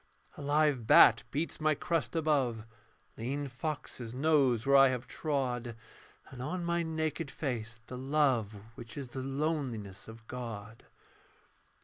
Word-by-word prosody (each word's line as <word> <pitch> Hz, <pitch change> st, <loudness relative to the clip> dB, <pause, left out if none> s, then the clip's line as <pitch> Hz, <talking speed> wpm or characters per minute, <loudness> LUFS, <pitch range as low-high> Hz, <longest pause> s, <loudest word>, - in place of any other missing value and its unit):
A -, -, -9 dB
live 145 Hz, -4 st, +2 dB
bat -, -, +8 dB
beats 155 Hz, +2 st, -3 dB
my 155 Hz, -1 st, +3 dB
crest 165 Hz, +2 st, -1 dB
above, 135 Hz, -8 st, +1 dB, 0.5 s
Lean 140 Hz, +5 st, -2 dB
foxes 130 Hz, -3 st, -5 dB
nose 135 Hz, -5 st, +3 dB
where 140 Hz, 0 st, +4 dB
I 135 Hz, 0 st, +8 dB
have 130 Hz, -1 st, -2 dB
trod, 125 Hz, -6 st, -2 dB, 0.6 s
And 125 Hz, -, -8 dB
on 175 Hz, +6 st, -3 dB
my 170 Hz, 0 st, +1 dB
naked 160 Hz, -1 st, -2 dB
face 115 Hz, -5 st, -4 dB
the 125 Hz, +1 st, -7 dB
love 130 Hz, -6 st, +1 dB, 0.2 s
Which 115 Hz, +2 st, -11 dB
is 135 Hz, -3 st, -5 dB
the 130 Hz, +2 st, -5 dB
loneliness 135 Hz, -, -3 dB
of 110 Hz, 0 st, -12 dB
God. 115 Hz, -3 st, -7 dB
135 Hz, 135 wpm, -32 LUFS, 120-150 Hz, 0.6 s, bat